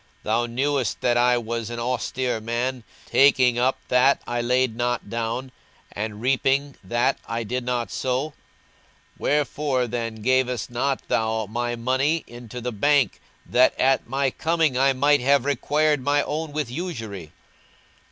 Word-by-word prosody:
Thou 115 +2 +1
knewest 135 0 -1
that 120 -1 +2
I 125 0 +4
was 115 -1 -3
an 120 - -5
austere 125 0 -2
man, 120 +2 -2 0.2
taking 130 -3 +4
up 130 +2 +2
that 125 +2 +4
I 120 0 -2
laid 125 -1 +1
not 120 -3 -2
down, 115 +3 -3 0.4
and 105 0 -5
reaping 135 +3 +1
that 120 +6 0
I 115 0 -2
did 125 +3 -3
not 120 -5 -2
sow: 130 +7 -1
42:019:023 - - -23 0.9
Wherefore 145 -3 0
then 115 -1 -3
gavest 130 -1 +1
not 135 +3 -1
thou 110 +1 0
my 120 +3 -2
money 130 +7 0
into 120 0 -9
the 125 +1 -3
bank, 125 - +2 0.2
that 125 +1 +3
at 135 -2 +2
my 135 +1 0
coming 160 -3 +1
I 135 +2 +4
might 145 +2 +3
have 140 +1 +3
required 150 +2 +1
mine 145 +2 +2
own 155 +1 -3
with 145 -5 -3
usury? 115 - -6
125 Hz, 150 wpm, -24 LUFS, 120-140 Hz, 0.9 s, I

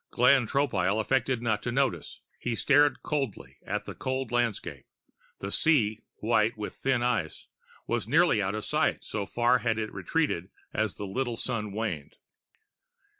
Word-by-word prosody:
Glenn 125 0 +4
Tropile 110 -8 +1
affected 125 +1 +1
not 110 -3 +1
to 125 - -3
notice. 120 - -1 0.2
He 120 -2 -2
stared 145 +4 +3
coldly 105 - -3
out - - -1
at - - -27
the - - -6
cold 130 -2 -3
landscape. 120 -4 -1 0.5
The 100 - -5
sea, 110 -10 +2 0.2
white 110 0 +1
with 105 - -5
thin 130 -2 0
ice, 110 -10 -1 0.4
was 115 -3 -1
nearly 155 -4 +4
out 95 +1 -1
of 110 - -4
sight, - - +1
so 100 -2 -4
far 120 +1 +3
had 115 -2 0
it 110 -1 -3
retreated 145 - -1 0.2
as 110 -3 0
the 105 - -5
little 120 +4 -2
sun 105 -3 -2
waned. 95 -9 -4
115 Hz, 160 wpm, -28 LUFS, 105-130 Hz, 0.5 s, Glenn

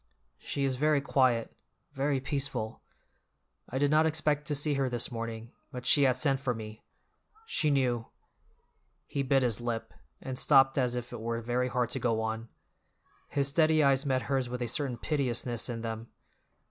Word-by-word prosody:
"She 140 - -3
is 135 -2 0
very 150 +1 +3
quiet—very 135 +1 -1
peaceful. 130 -5 -2 0.9
I 130 - -3
did 145 +1 +2
not 155 +1 +5
expect 150 -1 0
to 150 - 0
see 145 +1 +1
her 135 -2 0
this 120 0 0
morning, 115 0 -5 0.2
but 125 0 -7
she 145 - +5
had 130 -2 +3
sent 135 0 +1
for 125 -3 -1
me; 110 -1 -8 0.6
she 160 - +1
knew—" 125 -5 +1 1.0
He 140 - -2
bit 135 0 +2
his 120 -2 0
lip, 115 -1 -3 0.3
and 130 -1 -5
stopped 135 -1 +5
as 125 -2 +1
if 120 0 -5
it - - -6
were 115 0 -2
very 120 +2 0
hard 125 -1 0
to - - -2
go 115 -2 +1
on; 110 +1 -3 0.8
his 140 -1 +1
steady 155 +1 +4
eyes 135 -1 +4
met 130 -3 0
hers 135 -3 -1
with 125 0 -3
a - - -2
certain 125 0 -1
piteousness 125 -4 -1
in 115 -1 -4
them. 115 0 -5
130 Hz, 170 wpm, -30 LUFS, 120-140 Hz, 1.0 s, not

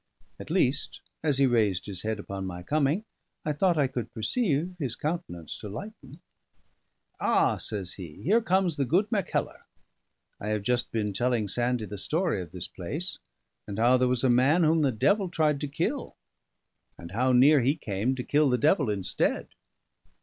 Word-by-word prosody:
At - - -9
least, 145 -5 +1 0.2
as 150 -4 +1
he 140 - +4
raised 110 -7 +2
his 95 -3 -2
head 110 0 -2
upon 100 -2 -5
my 90 -1 -6
coming, 150 - +1 0.4
I 150 - 0
thought 175 +3 +2
I 145 - +4
could 125 -2 -4
perceive 175 - 0
his 135 -7 -2
countenance 150 - -4
to 105 - -7
lighten. 155 - -9 1.0
"Ah!" - - +2
says 95 -4 -4
he, 85 -6 -10
"here 215 +9 +3
comes 185 -5 +1
the 140 - +1
good 180 - +2
Mackellar. 200 -6 -1 0.8
I 105 - -6
have 105 -2 -1
just 125 +2 0
been 105 -3 -1
telling 120 -1 0
Sandie 120 +2 0
the 105 -1 -6
story 160 - 0
of 85 -3 -9
this 90 -1 -5
place, 150 - -5 0.5
and 100 -1 -5
how 120 +3 +5
there 125 0 +2
was 125 0 +1
a - - +4
man 135 +8 +4
whom 160 +1 +3
the 140 -3 +3
devil 195 - +2
tried 155 -4 +1
to 145 - -2
kill, 140 - -3 0.8
and 85 0 -10
how 125 +5 +1
near 135 +3 +6
he 135 +5 +2
came 110 -2 -2
to 125 - -4
kill 145 +1 +3
the 125 - +2
devil 145 - +3
instead." 100 -3 -1
130 Hz, 180 wpm, -27 LUFS, 105-155 Hz, 1.0 s, near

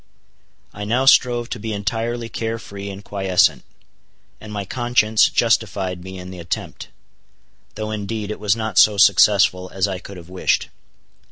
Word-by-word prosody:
I 105 - -7
now 120 +6 0
strove 120 -3 +4
to 120 - -5
be 110 +1 -4
entirely 115 +3 -3
care 115 0 -4
free 100 -2 -8
and 100 +1 -9
quiescent; 95 -7 +1 0.8
and 110 - -11
my 100 -1 -4
conscience 115 -1 +2
justified 95 -6 0
me 95 0 -8
in 90 0 -9
the 90 - -9
attempt; 85 0 -5 0.9
though 110 0 -4
indeed 105 0 -4
it - - -6
was 105 -1 +1
not 110 -4 0
so 105 -1 +5
successful 100 -2 +4
as 95 +1 0
I 95 -2 -4
could 95 +1 -11
have 85 -1 -12
wished. 90 0 -1
105 Hz, 160 wpm, -20 LUFS, 95-115 Hz, 0.9 s, so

